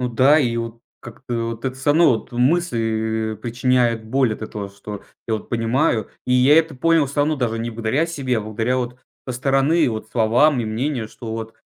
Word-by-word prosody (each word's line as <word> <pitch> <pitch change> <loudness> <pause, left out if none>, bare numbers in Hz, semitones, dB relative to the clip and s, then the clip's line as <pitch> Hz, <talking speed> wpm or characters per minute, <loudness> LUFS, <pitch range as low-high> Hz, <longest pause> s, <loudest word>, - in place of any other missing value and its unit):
Ну 125 - -1
да 130 +6 +4
и 120 -5 0
вот 115 0 -5 0.2
как-то 120 -1 -5
вот 115 +2 -8
это 130 0 -2
всё 135 +2 0
равно, 165 +1 +5
вот 110 - -4
мысли 115 -6 0
и 110 - -7
причиняют 120 0 0
боль 130 0 +1
от 110 - -7
этого, 105 -2 -5
что 100 0 -9 0.3
я 110 - +1
вот 110 - -6
понимаю, 115 0 +1 0.2
и 125 - +1
я 135 +5 +6
это 160 -3 0
понял 165 +2 +3
всё 145 +2 -2
равно 150 +1 +1
даже 115 -3 -1
не 115 +1 -3
благодаря 115 +8 0
себе, 135 -7 -2
а - - -2
благодаря 110 +4 -1
вот 125 0 -4 0.3
со - - -1
стороны 135 +5 +2
вот 110 0 -5
словам 125 +5 +3
и 115 - -2
мнению, 115 +1 -2
что 110 0 -9
вот, 115 0 -6
120 Hz, 210 wpm, -21 LUFS, 110-135 Hz, 0.3 s, я